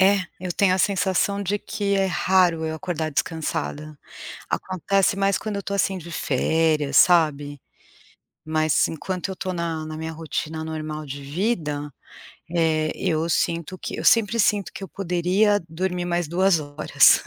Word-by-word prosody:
É, 195 +1 +5 0.2
eu 180 -1 -3
tenho 185 0 +3
a - - -1
sensação 200 +1 +1
de 200 +2 -1
que 205 -1 -2
é 195 -1 +2
raro 180 -3 +2
eu 160 0 -2
acordar 160 -2 -3
descansada. 155 -1 -3 0.5
Acontece 195 +3 0
mais 195 0 +2
quando 215 -2 -4
eu 200 - -3
tô 200 - -4
assim 195 -1 +1
de 170 0 -10
férias, 150 0 +1
sabe. 145 -5 +4 0.8
Mas, 155 -1 +2
enquanto 180 +3 -4
eu 190 - -5
tô 185 - -3
na 165 -2 -3
na 155 0 -6
minha 160 +1 -5
rotina 160 0 -4
normal 155 -1 -5
de 140 +1 -7
vida, 150 -2 -2 0.6
eh, 160 -2 +2
eu 165 -3 -1
sinto 170 +1 -1
que - - -5
eu - - -4
sempre 230 0 +4
sinto 200 -4 +1
que 195 - -7
eu - - -9
poderia 190 +3 +1
dormir 180 +2 -2
mais 175 -2 -1
2 180 0 +3
horas. 145 +1 +4
170 Hz, 160 wpm, -23 LUFS, 155-190 Hz, 0.8 s, É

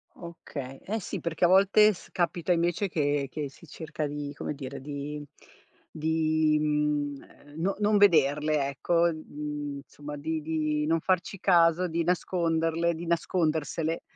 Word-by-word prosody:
Okay, 140 -6 -8
eh 220 +3 -2
sì - - -5
perché 170 +1 0
a - - +6
volte 200 +3 +6
s - - -14
capita 175 0 -1
invece 175 +3 +1
che 145 -3 0
che 145 -2 -4
si 160 +4 -17
cerca 155 0 -5
di, 145 0 -5
come 150 - -4
dire 135 -1 -7
di 145 +1 -5 0.7
di, 155 -1 +1
mhmm, 150 -1 -2
no 190 +4 0
non 210 0 +3
vederle, 150 -5 +4
ecco, 170 +5 +1
mhmm, 150 -2 -5
insomma 145 +1 -9
di 160 +2 -3
di 155 -1 -1
non 165 0 +2
farci 185 +1 0
caso, 170 +1 +4
di 165 0 -1
nasconderle, 170 -1 +1
di 170 +2 -6
nascondersele, 165 -1 0
160 Hz, 145 wpm, -28 LUFS, 150-170 Hz, 0.7 s, a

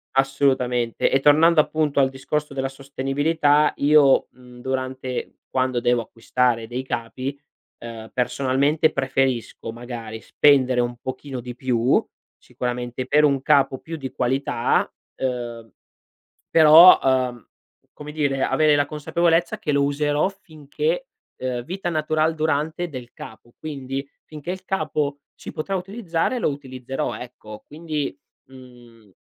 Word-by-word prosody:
Assolutamente, 130 -3 +1
e 135 - +3
tornando, 155 +4 +5
appunto, 150 -2 -1
al 135 -1 +4
discorso 140 +2 -3
della 135 0 -2
sostenibilità 145 +3 +1
io, 145 -1 +5
mhmm, 125 -1 -15
durante 130 0 -4
quando 130 -1 0
devo 120 0 +2
acquistare 115 0 -1
dei 125 +2 -4
capi, 130 +3 -5 0.4
ehm, 115 -1 -9
personalmente, 140 +5 +1
preferisco, 135 -4 -1
magari, 115 -2 -7
spendere 130 -4 +3
un 120 0 -3
pochino 130 +1 -6
di 120 0 -8
più, 125 -1 +1 0.3
sicuramente, 125 0 -4
per 150 +4 +3
un 140 -2 +2
capo 140 -3 +3
più 165 - -7
di 135 -4 -6
qualità, 125 -1 0 0.3
uhm, 120 -3 -4 0.8
però, 165 +3 +9
uhm, 130 -2 0 0.5
come 150 0 -9
dire, 140 -3 0
avere 155 -1 +3
la 145 -1 +2
consapevolezza 170 +6 0
che 170 - -3
lo 140 0 +2
userò 145 +3 +1
finché, 195 - -4 0.3
uhm 125 -1 -3
vita 185 +4 -4
natural 155 0 +1
durante 160 +2 -1
del 125 -4 -9
capo, 115 +2 -12
quindi 135 -3 -5 0.2
finché 155 +2 -8
il 185 0 -5
capo 145 -7 -1 0.2
si - - -10
potrà 195 +6 -4
utilizzare, 190 +2 -2
lo - - +1
utilizzerò, 130 -2 -5
ecco, 110 -3 -10
quindi, 150 -3 -4 0.3
mhm 120 -5 -16
135 Hz, 125 wpm, -22 LUFS, 125-150 Hz, 0.8 s, però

